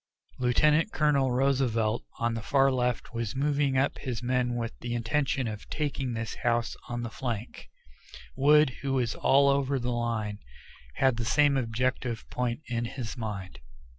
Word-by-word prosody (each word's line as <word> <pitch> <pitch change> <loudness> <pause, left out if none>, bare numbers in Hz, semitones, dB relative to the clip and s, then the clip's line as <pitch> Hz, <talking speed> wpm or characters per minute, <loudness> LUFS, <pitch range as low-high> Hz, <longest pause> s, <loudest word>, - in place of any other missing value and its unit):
Lieutenant 150 - +3
Colonel 140 -4 +2
Roosevelt 125 -4 +1
on 115 0 0
the 115 - -3
far 135 +4 +3
left 125 -1 -1
was 115 -1 -3
moving 140 -1 +1
up 135 +2 +1
his 125 -3 -4
men 125 0 0
with 115 -1 -3
the 120 0 -3
intention 130 +2 0
of 105 -1 -7
taking 140 -4 -2
this 115 -1 -4
house 120 -1 +1
on 120 0 -3
the 120 - -5
flank; 120 -3 -5 0.7
Wood, 150 0 +5
who 135 -1 -1
was 125 -4 +1
all 140 +1 +4
over 140 0 +2
the 125 -1 -2
line, 115 -3 -2 0.6
had 130 -3 +2
the 115 - -2
same 145 +2 +4
objective 125 -1 -1
point 125 +2 -2
in 120 -1 -1
his 120 -1 -5
mind. 100 - -6
125 Hz, 160 wpm, -28 LUFS, 115-135 Hz, 0.7 s, Wood